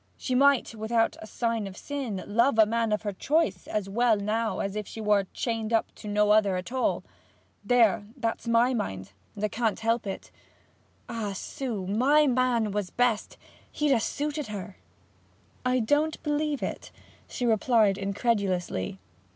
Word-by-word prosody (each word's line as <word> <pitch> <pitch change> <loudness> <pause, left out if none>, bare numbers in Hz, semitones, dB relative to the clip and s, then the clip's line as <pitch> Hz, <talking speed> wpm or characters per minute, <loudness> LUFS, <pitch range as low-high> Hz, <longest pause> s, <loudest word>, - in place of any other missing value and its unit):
She 255 - -3
might, 275 -1 +4
without 225 +1 0
a 215 - -8
sign 230 -2 -1
of 190 0 -10
sin, 260 -10 -4
love 235 +4 +2
a 220 - +7
man 230 0 0
of 210 +1 0
her 205 -2 -2
choice 210 - 0
as 210 -2 -2
well 225 +2 +2
now 215 +2 -1
as 195 +1 -3
if 210 -1 -4
she - - -8
were 210 -2 +2
chained 225 -2 -2
up 225 -1 +1
to - - -11
no 210 0 +2
other 205 -3 +4
at 180 +5 -5
all. 260 -1 0 0.6
There, 225 -5 +3
that's 230 -2 -2
my 235 +2 +4
mind, 95 - -4 0.2
and 205 - -6
I - - +3
can't 225 0 -1
help 230 -1 0
it. 195 - -6 0.8
Ah, 220 -4 -3
Sue, 215 0 -4
my 265 +10 +4
man 250 -4 +2
was 205 -2 -2
best! 240 +1 0 0.3
He'd 295 -2 +2
ha' 230 - +1
suited 295 +1 -2
her.' 200 -2 -6 0.9
'I 255 0 +2
don't 295 +8 +1
believe 295 -1 -1
it,' - - -4 0.4
she 250 - -3
replied 220 -3 +3
incredulously. 195 - -1
225 Hz, 165 wpm, -27 LUFS, 205-245 Hz, 0.9 s, a